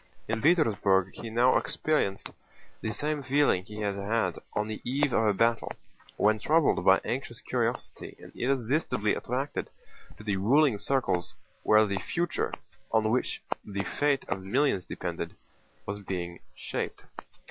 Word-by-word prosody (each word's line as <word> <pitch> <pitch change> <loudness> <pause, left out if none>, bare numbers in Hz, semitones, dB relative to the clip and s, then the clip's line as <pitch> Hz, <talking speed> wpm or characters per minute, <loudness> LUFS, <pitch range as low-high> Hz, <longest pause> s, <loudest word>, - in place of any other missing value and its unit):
In 115 0 -1
Petersburg 100 - +3
he 115 - -7
now 120 +3 +4
experienced 150 -11 -1 0.5
the 110 - -2
same 150 +6 -2
feeling 135 -8 +2
he 105 +2 -8
had 100 -1 0
had 105 +3 -1
on 105 +1 -1
the 110 -1 -5
eve 140 +1 0
of 110 -2 +3
a - - +5
battle, 115 +2 +2 0.5
when 110 +1 +3
troubled 160 +4 +3
by - - +6
anxious - - -3
curiosity - - -3
and - - -13
irresistibly 125 -4 +1
attracted 135 +4 -3 0.5
to - - -11
the 100 -2 0
ruling 125 +3 +4
circles 120 -11 0 0.3
where 110 0 +5
the 100 -2 -2
future, 175 -1 -1 0.4
on 110 -1 +3
which 125 - -1 0.2
the 100 -1 -3
fate 145 +3 0
of 95 - -2
millions 100 -2 +1
depended, - - -4 0.5
was 100 +1 -4
being 90 -3 -4 0.2
shaped. - - -4
110 Hz, 145 wpm, -29 LUFS, 100-140 Hz, 0.5 s, by